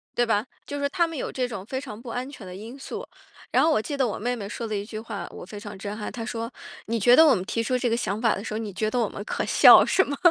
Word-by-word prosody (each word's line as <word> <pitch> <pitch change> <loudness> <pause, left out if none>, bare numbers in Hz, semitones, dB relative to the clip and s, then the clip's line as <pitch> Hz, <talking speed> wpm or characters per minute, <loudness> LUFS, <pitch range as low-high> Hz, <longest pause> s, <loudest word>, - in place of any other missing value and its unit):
对 240 - +3
吧。 220 -1 +1 0.2
就 285 - -5
是 280 - +1
他 345 +2 +2
们 330 -2 -6
有 - - -3
这 255 -1 -1
种 200 -6 -7
非 260 +4 -3
常 235 -6 -8
不 240 - -9
安 250 +3 -4
全 245 -9 -10
的 180 - -8
因 225 +7 -9
素， 440 - -6 0.5
然 - - +4
后 - - +4
我 215 - +3
记 285 +4 -4
得 265 -2 +2
我 215 - -3
妹 245 +4 -1
妹 205 -4 -6
说 230 +3 -5
的 215 -1 -3
一 200 0 -3
句 215 0 -7
话， 200 -5 -6
我 - - -9
非 205 +3 -8
常 205 -2 -8
震 200 +1 -5
撼。 210 - -4
她 235 - -5
说： 230 -1 -4 0.4
“你 230 0 0
觉 245 +4 +6
得 320 - +8
我 285 -5 +6
们 185 - -2
提 230 - -2
出 250 +3 0
这 250 -1 0
个 230 - +1
想 210 -2 -2
法 225 -3 +3
的 200 - -5
时 215 - -5
候， - - -1
你 220 -2 -4
觉 215 +3 -1
得 245 - -2
我 220 - +1
们 200 - -7
可 - - -2
笑 - - +8
是 380 - +3
吗？” 285 0 -4
230 Hz, 350 characters per minute, -25 LUFS, 210-255 Hz, 0.5 s, 得